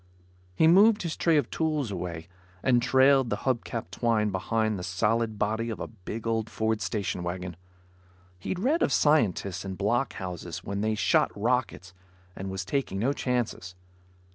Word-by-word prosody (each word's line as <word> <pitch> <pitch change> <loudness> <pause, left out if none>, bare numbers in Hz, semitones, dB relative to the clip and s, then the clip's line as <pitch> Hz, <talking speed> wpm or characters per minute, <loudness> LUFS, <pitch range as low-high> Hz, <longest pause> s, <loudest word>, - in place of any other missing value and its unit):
He 160 - +4
moved 205 +6 +6
his 165 -2 -3
tray 165 -2 +3
of 145 - 0
tools 155 -7 -1
away 85 -3 -5 0.4
and 125 -2 +4
trailed 130 0 +4
the 105 - 0
hub 130 -3 +1
cap 115 -6 -5
twine 110 0 +1
behind 110 +2 -1
the - - -6
solid 110 +4 0
body 110 +3 -1
of 110 - -5
a - - -3
big 110 +1 -8
old 115 -1 -1
Ford 110 -1 -1
station 95 0 -2
wagon. 90 0 -4 0.8
He'd 175 - -3
read 280 - +1
of - - +2
scientists 100 - +2
in 95 -1 -5
block 120 +7 0
houses 90 -2 -6
when 100 +1 -3
they 110 0 0
shot - - +3
rockets 115 -6 -1 0.4
and 95 +1 -5
was 95 0 -4
taking 135 -9 -2
no 125 +8 +1
chances. 120 -9 -2
110 Hz, 165 wpm, -27 LUFS, 95-130 Hz, 0.8 s, moved